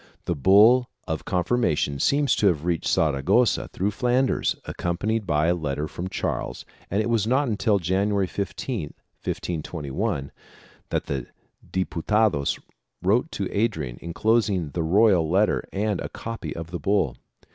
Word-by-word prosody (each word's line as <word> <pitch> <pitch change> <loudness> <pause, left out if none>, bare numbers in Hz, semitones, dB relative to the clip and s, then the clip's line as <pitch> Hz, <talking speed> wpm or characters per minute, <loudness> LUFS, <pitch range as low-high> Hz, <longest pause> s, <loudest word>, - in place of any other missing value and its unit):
The 85 - 0
bull 105 - +6 0.2
of 80 -1 -3
confirmation 90 - 0
seems 140 - +3
to 105 - +3
have 80 -4 +1
reached 85 -2 0
Saragossa 80 - +2
through 100 +3 -1
Flanders, 125 +4 +1
accompanied 100 +5 -2
by 75 -1 +2
a 85 - +3
letter 75 -3 -2
from 90 +4 -5
Charles - - -3 0.2
and 100 +3 +1
it - - -2
was 115 -3 +1
not 135 +4 +2
until 105 -1 +2
January 95 +3 +1
15, 100 - -4 0.3
1521, 80 0 -3 0.6
that - - -1
the 65 -3 -3 0.4
Diputados 95 -3 +1 0.5
wrote 115 - +2
to 100 - -2
Adrian 80 - -1
enclos 110 +7 +1
ing 90 -7 -2
the 85 - -2
royal 90 -1 +4
letter 100 +5 +2
and 105 -1 -1
a - - -4
copy 115 0 -6
of 85 0 -7
the 90 - -4
bull. 95 -8 +1
95 Hz, 145 wpm, -25 LUFS, 80-110 Hz, 0.6 s, bull